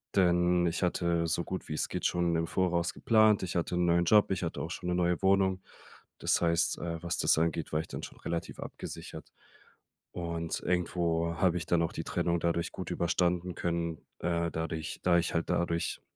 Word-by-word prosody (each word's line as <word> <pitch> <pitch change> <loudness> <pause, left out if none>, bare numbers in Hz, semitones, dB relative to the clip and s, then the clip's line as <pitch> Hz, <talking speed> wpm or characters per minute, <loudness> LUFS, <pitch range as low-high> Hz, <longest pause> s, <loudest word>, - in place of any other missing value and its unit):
denn 90 -1 +3
ich 85 +2 -2
hatte 85 -1 +1
so 85 +1 0
gut 95 - -6
wie 75 - -2
es - - -1
geht - - -3
schon 85 -1 +1
im 80 0 0
Voraus 85 -1 0
geplant. 110 -3 +4
Ich 90 - -4
hatte 85 +1 0
'n 90 0 +2
neuen 85 0 +3
Job, 105 +1 +5
ich 95 -2 -1
hatte 85 - -3
auch 80 - -4
schon 90 - -4
'ne 90 - +1
neue 90 -1 +1
Wohnung. 95 -1 +3 0.6
Das - - +2
heißt, 85 0 +2
äh, 85 -1 -4
was 85 +1 -1
das - - +3
angeht, 80 -1 0
war 75 - +2
ich 80 - -10
dann - - -7
schon - - -9
relativ 85 0 -4
abgesichert. - - -8 0.8
Und 85 -2 -3
irgendwo 85 -2 0
habe 90 -1 +3
ich 85 - -4
dann 85 -1 +3
auch 80 - -2
die - - -4
Trennung 85 0 0
dadurch 85 0 0
gut 95 - -6
überstanden 90 0 0
können, 85 -2 -2 0.2
äh, 85 -1 0
dadurch 80 -1 -4
da 85 -1 +4
ich 85 - 0
halt 85 - -1
dadurch 85 -1 -1
85 Hz, 200 wpm, -30 LUFS, 85-90 Hz, 0.8 s, Job